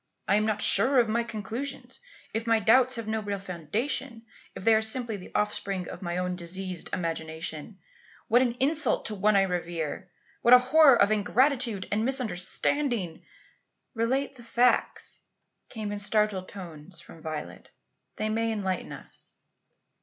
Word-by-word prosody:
I - - +3
am 210 +1 +3
not 215 -1 -1
sure 265 +2 +4
of 240 -2 +5
my 235 +2 +1
conclusions. 230 +5 -6 0.3
If 225 +1 -2
my 225 -1 +4
doubts 250 +4 +4
have 230 -2 -5
no 220 0 -1
real 205 -1 -3
foundation 220 - -3 0.3
if - - -8
they 225 - +5
are 220 - +4
simply 225 0 0
the 185 - -9
offspring 195 -3 -1
of - - -8
my 175 -1 -3
own 180 0 -1
diseased 180 0 -4
imagination, 160 +1 -4 0.5
what 245 +2 +5
an 245 -2 +1
insult 280 +3 +1
to 215 - -2
one 210 +1 +2
I 195 - +5
revere! 175 -1 -3 0.3
What 240 +1 +8
a - - +10
horror 270 +1 +6
of 200 +1 +4
ingratitude 235 -1 +1
and 210 +1 +1
misunderstanding 240 - 0 0.4
" - - -46 0.3
"Relate 260 +4 -1
the 240 - -12
facts," 240 +2 +1 0.5
came 215 -3 -5
in 205 - -4
startled 205 -2 0
tones 170 -3 -10
from 165 - -14
Violet. 155 -1 -7 0.5
"They 215 - -2
may 225 +1 0
enlighten 190 -4 -3
us." - - -9
215 Hz, 160 wpm, -27 LUFS, 185-240 Hz, 0.5 s, a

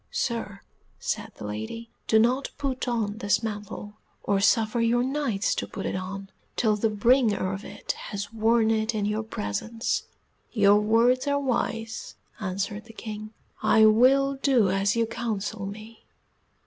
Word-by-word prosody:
"Sir," 235 - -3 0.4
said - - -3
the 105 - -8
lady, 110 - -6 0.2
"do 220 - +4
not 250 +5 +2
put 265 -3 -2
on 220 -3 -1
this 205 0 +1
mantle, 210 -1 -5 0.3
or 200 -1 +1
suffer 220 +3 +3
your 235 +1 +3
Knights 260 -6 0
to - - -3
put 195 - -6
it - - -2
on, 195 +1 -5 0.2
till 215 -3 +2
the 220 +2 +1
bringer 215 -3 +2
of 195 +2 -6
it - - -5 0.2
has 205 +1 -5
worn 225 0 +3
it 220 0 0
in 210 -1 0
your 210 +1 0
presence." 220 - -3 0.5
"Your 205 -2 +5
words 235 +5 +3
are 285 0 +2
wise," 230 -4 -2 0.2
answered 200 +2 -3
the 225 - -13
King, 215 -1 -7 0.3
"I 220 - +5
will 270 +5 +4
do 240 -9 +4
as 195 +2 +1
you 230 0 +2
counsel 220 -3 -3
me. 215 +2 -10
220 Hz, 155 wpm, -26 LUFS, 205-235 Hz, 0.5 s, Your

